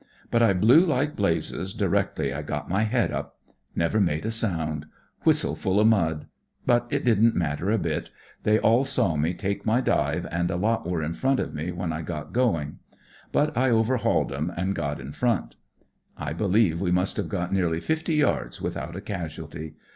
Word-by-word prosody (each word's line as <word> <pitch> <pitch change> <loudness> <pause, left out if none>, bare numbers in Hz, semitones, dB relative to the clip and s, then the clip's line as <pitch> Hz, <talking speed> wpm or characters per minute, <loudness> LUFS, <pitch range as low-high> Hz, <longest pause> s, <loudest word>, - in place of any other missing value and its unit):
But 115 - +3
I 115 -4 +5
blew 115 - +6
like 150 -3 0
blazes 95 0 -1
directly 70 -1 0
I 75 - -3
got 75 - -4
my 100 +5 +1
head 120 +1 +1
up. - - -5 0.4
Never 85 +6 +1
made 80 -2 0
a 110 - -1
sound. 80 -9 -1 0.4
Whistle - - +3
full 95 +2 0
of 105 - +4
mud. 80 -8 +1 0.4
But 120 0 +3
it - - -1
didn't 115 -1 +4
matter 85 +2 -1
a 110 - +3
bit. 80 -5 -2 0.3
They 105 0 +3
aU 115 +4 +4
saw 125 - +1
me 80 +4 0
take 100 +1 -3
my 110 +3 +2
dive, 130 - 0
and 85 +1 0
a - - -1
lot 110 +2 0
were 85 -3 -1
in 80 +2 -2
front 135 +7 +1
of - - -3
me 80 +3 -3
when 90 -1 -3
I 80 - -3
got 75 -2 -6
going. 90 - 0 0.5
But 150 -2 +1
I 130 +2 +3
overhauled 115 - +2
'em, 75 +6 -2
and 95 +3 0
got 75 -5 -3
in 65 +2 -7
front. 120 +7 0 0.6
"I 75 0 -4
beUeve 95 -1 +2
we 90 -1 0
must 90 +2 +1
have - - -2
got 90 -3 -2
nearly 85 -4 +1
fifty 160 - -1
yards 140 - 0
without 80 +4 -4
a 95 - -5
casualty. 80 -5 -6
95 Hz, 190 wpm, -26 LUFS, 80-115 Hz, 0.6 s, blew